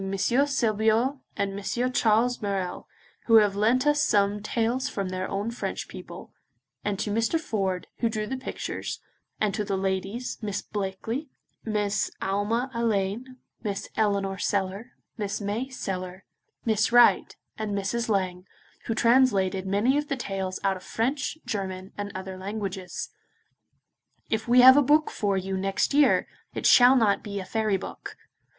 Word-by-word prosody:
Sebillot 230 +3 +1 0.2
and 200 -1 -1
M. 245 +5 -1
Charles 240 0 +2
Marelles, 195 -3 -3 0.4
who 225 - +6
have 210 -3 +5
lent 230 +6 +2
us 295 0 +3
some 205 0 +2
tales 235 +4 -1
from 195 -5 -3
their 185 0 -3
own 205 +4 -2
French 235 - -4
people, - - -10 0.5
and 205 -1 -1
to 205 - -2
Mr. 230 +9 +1
Ford, 195 - -2
who 230 - +1
drew 215 -1 -2
the 265 - -3
pictures, 260 0 -5 0.4
and 210 -2 +1
to 210 - -1
the 200 -1 -2
ladies, 195 +5 -3
Miss 205 -3 -3
Blackley, 215 +8 -4 0.3
Miss 210 -2 0
Alma 210 +6 -1
Alleyne, 230 +2 -1 0.2
Miss 200 -3 -4
Eleanor 200 -3 0
Sellar, 200 +4 -2 0.3
Miss 205 0 -2
May 215 +6 -3
Sellar, 185 -6 -5 0.4
Miss 215 -1 +2
Wright, 240 0 +5 0.2
and 210 -2 -2
Mrs. 230 +4 -2
Lang, 185 -3 -1 0.4
who 225 - -1
translated 205 -6 +3
many 225 +9 +2
of 295 - -4
the 275 - -2
tales 190 -5 -3
out 195 -1 +1
of - - -13
French, 260 +6 -2
German, 190 -2 -4
and 205 0 -5
other 190 0 -6
languages. 195 -2 -5 1.2
If 220 +1 -1
we 245 +1 +6
have 260 +2 +9
a - - +7
book 300 +3 +3
for 200 -2 0
you 190 0 -2
next 195 +7 0
year, 290 0 +4 0.3
it - - -4
shall 250 +1 +7
not 220 -5 +3
be 200 -1 -5
a 190 - -6
fairy 215 -1 0
book. - - -8
210 Hz, 155 wpm, -26 LUFS, 195-240 Hz, 1.2 s, have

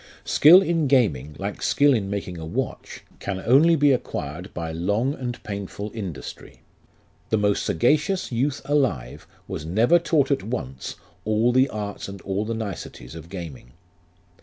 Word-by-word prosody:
Skill 175 +6 +7
in 165 -5 +1
gaming, 75 - +2
like 100 +1 -5
skill 145 0 +4
in 100 -5 -1
making 95 -4 -4
a - - -7
watch, 120 +11 -4 0.2
can 95 -2 -3
only 155 +7 +6
be 145 -2 +4
acquired 90 - -3
by 80 -2 -4
long 105 - 0
and 125 -4 -6
painful 100 +1 -5
industry. 95 -10 -8 0.7
The 110 - +2
most 105 -1 +1
sagacious 150 - +1
youth 130 +4 -1
alive 135 - -1 0.2
was - - -5
never 110 - +3
taught 150 -5 +1
at 140 - +2
once 95 - -5 0.3
all 110 +3 +2
the 130 +2 +4
arts 105 -2 -5
and 100 0 -8
all 100 +2 -2
the 115 +1 -2
niceties 100 - -6
of 80 0 -10
gaming. 80 -10 -8
105 Hz, 155 wpm, -24 LUFS, 90-135 Hz, 0.7 s, Skill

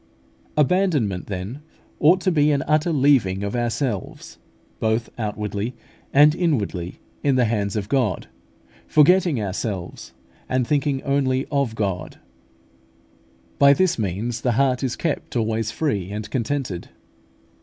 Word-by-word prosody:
xxxvii. - - -34
5). 150 - +5
Abandonment, 145 - 0
then, 100 +7 -5 0.4
ought 170 +5 +5
to 185 - +1
be 150 -3 +3
an 140 -2 +1
utter 155 +3 +1
leaving 130 - +3
of 100 +3 -3
ourselves, 120 -3 -3 0.4
both 110 +1 0
outwardly 105 +1 -3 0.4
and 150 +2 +6
inwardly, 110 - -1 0.2
in 140 -2 +2
the 125 -2 +3
hands 105 -3 -1
of 100 -2 -2
God, 130 -2 0 0.6
forgetting 165 -1 +4
ourselves, 95 -2 -4 0.4
and 130 -1 +1
thinking 140 0 0
only 135 -1 +1
of 140 -6 0
God. 95 -5 -3 1.4
By 140 0 +7
this 185 -3 +1
means 110 +4 -2
the 125 - +1
heart 130 0 +2
is 130 -3 -1
kept 160 -5 -3
always 110 -1 0
free 105 - -2
and 105 +1 -5
contented. 125 -6 -3
125 Hz, 135 wpm, -22 LUFS, 105-145 Hz, 1.4 s, By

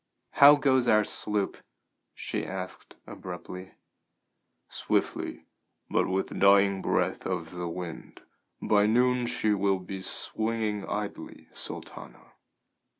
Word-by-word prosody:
"How 145 +1 +8
goes 130 -4 +2
our 110 -2 +5
sloop?" 105 -1 0 0.6
she - - -3
asked 95 -1 -7
abruptly. 90 +1 -8 0.9
"Swiftly, - - -2 0.5
but - - +2
with 95 +1 -1
the - - -8
dying 100 0 +4
breath - - 0
of 85 -3 -3
the 90 -1 -5
wind. 85 -1 -8 0.4
By 105 -1 +3
noon 125 +2 +2
she 110 -2 +1
will 100 -1 +1
be 95 +1 -7
swinging 110 +1 -2
idly, 105 0 -5
Sultana." - - -7
100 Hz, 110 wpm, -28 LUFS, 95-110 Hz, 0.9 s, How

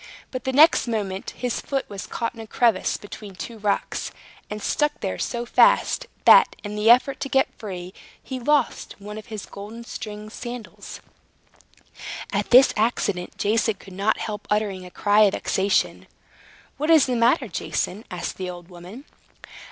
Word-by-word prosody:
But 255 -2 -5
the 265 - 0
next 300 0 +5
moment 200 -4 -3
his 245 -2 -2
foot 270 -1 -2
was 200 -2 -7
caught 230 - -3
in 230 - -14
a 220 - -9
crevice 225 -4 +1
between 205 -1 -10
two 225 +4 -7
rocks, 205 -1 -1 0.4
and 210 - -5
stuck 295 +7 0
there 190 - -3
so 240 -1 -2
fast, - - +3 0.2
that, - - +7
in 210 -1 -5
the 210 +2 +2
effort 260 +3 +5
to 275 - -4
get 265 -1 +2
free, 185 -3 -7 0.3
he 260 -1 -6
lost 285 +1 0
one 210 +1 -8
of 215 - -13
his 215 -3 -6
golden 215 +4 -9
stringed 210 -2 -7
sandals. 240 -1 -8 1.3
At - - -1
this 255 +2 +7
accident 205 -5 -1
Jason 220 +1 +1
could 195 -1 -14
not 200 +4 +1
help 210 -1 -5
uttering 200 -3 -1
a - - -11
cry 205 +3 +3
of 200 - +2
vexation. 195 +1 0 0.7
"What 305 +3 -2
is 320 -4 +7
the 255 - -1
matter, 235 +2 +3
Jason?" 180 +3 -3
asked 180 -1 -5
the 185 -1 -4
old 175 0 -9
woman. 180 +10 -11
215 Hz, 165 wpm, -24 LUFS, 200-245 Hz, 1.3 s, that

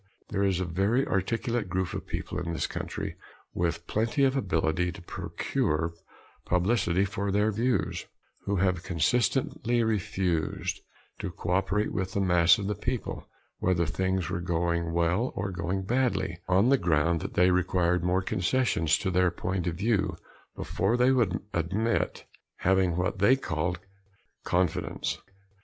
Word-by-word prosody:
There 100 -2 -1
is 95 -2 +2
a 95 - -1
very 100 +10 +1
articulate 115 +2 -1
group 95 0 -1
of - - -5
people 90 - -4
in 85 -1 -3
this 80 - -1
country, - - -5 0.4
with 85 -1 -1
plenty 115 +8 0
of 135 0 +3
ability 90 - 0
to 95 - -10
procure 80 -1 -2 0.5
publicity 95 0 +2
for 100 +1 -2
their 105 +2 +2
views, 120 +4 -1 0.4
who 100 - 0
have 90 -2 +1
consistently 120 - +1
refused 95 -6 -1 0.4
to 100 - -3
cooperate 95 +4 0
with 95 0 -2
the - - 0
mass 90 -1 +5
of 100 - -4
the 105 - 0
people, - - -4 0.3
whether 85 -2 +2
things 95 +2 -1
were 90 -1 -2
going 85 -1 0
well 85 +8 +1
or 100 0 -2
going 90 +2 -2
badly, 120 -7 0
on 95 +6 +4
the 135 -1 +4
ground 85 0 +2
that - - -6
they 90 +1 +5
required 90 -1 +2
more 90 +1 +1
concessions 90 -4 +1
to 95 - -2
their 90 0 +3
point 90 +1 -3
of 85 - -1
view 100 +1 +1 0.4
before 100 +6 0
they 125 +2 +4
would 120 -6 +2
admit 95 +7 0 0.4
having 95 -2 +2
what 95 +2 -1
they 100 +7 +6
called 85 -7 -2 0.7
"confidence." 90 -2 0
95 Hz, 145 wpm, -28 LUFS, 85-105 Hz, 0.7 s, they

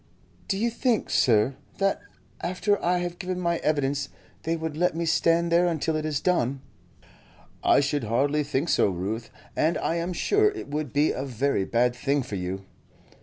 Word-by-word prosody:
"Do 195 - 0
you 230 +3 +1
think, 235 -1 0
sir, 115 +2 +3 0.2
that 195 0 +1 0.4
after 185 +3 0
I 180 +1 +2
have 175 0 -4
given 180 -1 -3
my 170 -1 +1
evidence 145 -2 0 0.3
they 165 +1 -1
would 160 -2 -4
let 175 +1 +1
me 170 0 -1
stand 165 +1 +2
there 175 +1 +4
until 160 -1 0
it 155 0 -1
is 150 -3 -1
done?" 140 -7 0 1.0
"I - - +5
should 140 -2 -1
hardly 140 +7 +1
think 145 +3 -1
so, - - +3
Ruth, 100 +6 -4 0.3
and 160 +2 +2
I 165 - -1
am 170 +2 -2
sure 420 - +3
it 410 - -7
would 150 -2 -3
be 145 +2 +3
a 130 - -3
very 135 -5 0
bad 120 +2 +2
thing 140 +2 0
for 115 -4 -6
you." 95 +1 -4
155 Hz, 180 wpm, -26 LUFS, 135-175 Hz, 1.0 s, I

